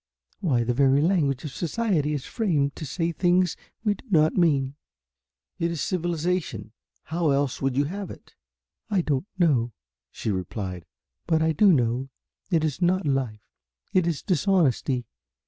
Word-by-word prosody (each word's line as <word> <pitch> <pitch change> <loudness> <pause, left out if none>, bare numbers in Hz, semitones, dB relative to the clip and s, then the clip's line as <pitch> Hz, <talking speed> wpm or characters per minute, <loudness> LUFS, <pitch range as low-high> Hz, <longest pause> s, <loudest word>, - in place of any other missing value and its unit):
Why 130 -10 +1
the 120 +1 0
very 135 +2 +4
language 150 -5 +1
of 150 - -5
society 170 - 0
is 140 - -4
framed 150 -11 0
to 155 - -6
say 170 +3 -1
things 180 +1 +2 0.3
we 210 -2 +3
do 205 - -15
not 155 -4 +4
mean." 140 -7 +2 0.9
"It 170 - +1
is 170 -2 -3
civilization. 170 - -1 0.3
How 165 0 0
else 140 -1 0
would 135 -1 0
you 140 - +4
have 195 +6 -5
it?" - - -12 0.6
"I 200 -4 +2
don't 150 +2 -1
know," 130 -10 +2 0.4
she 110 - -3
replied, 95 -2 -4 0.4
"but 160 -2 +3
I 160 - +3
do 195 +6 +5
know 125 -2 +1 0.4
it 165 -4 +2
is 155 +2 -2
not 180 +1 +2
life. 130 -7 -1 0.5
It 185 -2 +3
is 165 -5 -2
dishonesty. 160 - +1
155 Hz, 155 wpm, -25 LUFS, 135-175 Hz, 0.9 s, do